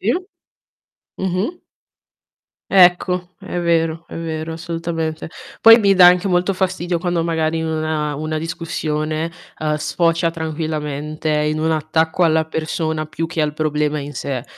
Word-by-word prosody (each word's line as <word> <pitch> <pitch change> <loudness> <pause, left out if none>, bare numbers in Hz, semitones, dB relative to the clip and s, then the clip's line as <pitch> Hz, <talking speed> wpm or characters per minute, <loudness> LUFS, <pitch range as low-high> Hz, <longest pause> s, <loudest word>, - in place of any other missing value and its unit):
Sì. 215 +5 +1 1.0
Mh-mh. 190 - -2 1.1
Ecco 180 -1 +4
è 195 -2 -5
vero 165 -1 0
è - - -9
vero 160 -1 -4
assolutamente. 165 -1 -4 0.3
Poi 225 +1 +9
mi 200 -2 +4
dà 180 -1 +8
anche 180 +2 +5
molto 180 +2 +2
fastidio 180 -2 -1
quando, 175 -1 -1
magari, 160 -1 0
una 155 -2 -1
una 155 +2 -3
discussione, 155 -1 -3 0.3
ehm, 155 -1 0
sfocia 165 +2 +1
tranquillamente 155 -1 -4
in 150 0 +1
un 160 - +1
attacco 160 +2 0
alla 160 -1 +3
persona 160 0 -2
più 155 +2 -3
che 165 -1 -2
al 150 -1 0
problema 150 0 -1
in 145 0 -6
sé. 130 -3 -4
160 Hz, 135 wpm, -19 LUFS, 155-175 Hz, 1.1 s, Poi